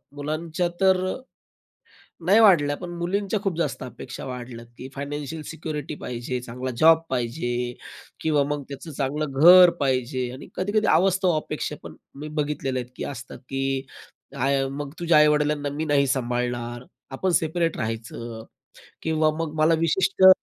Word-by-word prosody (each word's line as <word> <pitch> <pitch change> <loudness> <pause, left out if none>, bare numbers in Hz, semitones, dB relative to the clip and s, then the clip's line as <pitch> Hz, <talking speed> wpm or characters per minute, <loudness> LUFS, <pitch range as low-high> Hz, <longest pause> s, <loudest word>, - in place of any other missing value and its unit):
मुलांच्या 155 +4 -2
तर, 190 -1 +5 1.3
नाही 200 +5 +6
वाढल्या 165 -9 +5
पण 175 -1 -7
मुलींच्या 195 +4 -1
खूप 185 -4 -1
जास्त 170 - -2
अपेक्षा 125 0 -8
वाढल्यात, 125 -2 -7
की 130 - -8
फायनान्शियल 145 +2 -5
सिक्युरिटी 155 -2 -5
पाहिजे, 125 +1 -4
चांगला 125 +2 -5
जॉब 160 0 +6
पाहिजे 120 -1 -2 0.5
किंवा 150 -3 +2
मग 145 -1 -2
त्याचं 140 +3 -8
चांगलं 140 0 -2
घर 180 +1 +10
पाहिजे, 130 -2 0
आणि 130 - -10
कधी-कधी 205 +3 0
अवास्तव 185 +2 +3
अपेक्षा 150 0 -4
पण - - -9 0.3
मी 155 - -5
बघितलेले 135 -3 -2
आहेत, 125 0 -7
की - - -5
असतात, 130 -3 -7
की 135 0 -1 0.9
मग 140 0 -5
तुझ्या 170 -2 +4
आई-वडिलांना 150 -1 +3
मी 150 +3 -3
नाही 140 -2 +3
सांभाळणार 120 -1 -2 0.3
आपण 185 +7 0
सेपरेट 165 +1 +1
राहायचं 115 0 -5 0.6
किंवा 155 -1 +2
मग 165 -2 -2
मला 160 +1 +5
विशिष्ट 190 +3 +4
145 Hz, 140 wpm, -24 LUFS, 130-165 Hz, 1.3 s, घर